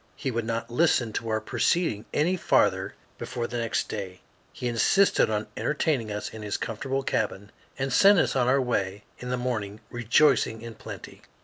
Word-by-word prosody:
He 135 - -3
would 115 -1 -2
not 115 +1 -3
listen 120 -5 +2
to 115 - -3
our 110 0 +1
proceeding 110 - 0
any 170 +5 +2
farther 180 - +2 0.2
before 120 -1 -4
the 120 0 -4
next 115 -1 -1
day. 95 -3 -6 0.3
He 125 - -4
insisted 120 - +3
on 105 0 -1
entertaining 140 -7 0
us 105 0 -4
in 110 - -8
his 105 -1 -2
comfortable 135 +4 -3
cabin, 105 -4 -2 0.3
and 135 -1 -2
sent 200 +8 +7
us 160 - +2
on 125 -2 +2
our 135 +2 +4
way 100 -5 -2 0.2
in 125 - -6
the 125 - 0
morning, 110 -5 -3
rejoicing 120 -1 +2
in 115 -1 -7
plenty. - - -10
120 Hz, 180 wpm, -26 LUFS, 110-135 Hz, 0.3 s, sent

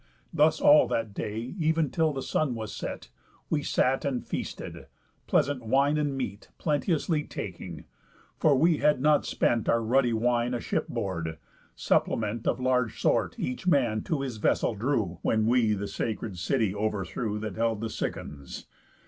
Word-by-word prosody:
Thus 155 0 +4
all 295 0 +7
that 115 -3 -2
day, 110 +5 -4
ev'n 160 -1 +2
till 160 -2 +2
the 135 -2 -4
sun 140 -6 0
was 110 -2 -5
set, - - -6 0.4
We 150 - +2
sat 135 -1 +1
and 135 -3 -2
feasted, - - -6 0.4
pleasant 140 -3 +1
wine 135 +6 +3
and 145 -2 -1
meat 105 -6 -5
Plenteously 155 0 0
taking; 85 -4 -7 0.5
for 150 -3 +4
we 160 +3 +4
had 150 -3 +3
not 150 +2 +3
spent 115 -2 +1
Our 115 0 +3
ruddy 125 +2 +3
wine 120 +2 +1
aship 120 - -2
board, 85 -4 -3 0.4
supplement 110 +1 0
Of 120 - +1
large 125 -3 +1
sort - - +1
each 125 +9 -4
man 125 -10 +3
to 155 -4 -1
his 130 -5 -4
vessel 110 - +1
drew, 105 - -1
When 110 -1 +1
we 115 -2 +3
the 100 0 -3
sacred 100 -1 -4
city 110 +1 +1
overthrew 105 +1 -2
That 105 -2 -4
held 115 -1 0
the 115 - -2
Cicons. 70 -2 -5
120 Hz, 155 wpm, -28 LUFS, 105-145 Hz, 0.5 s, all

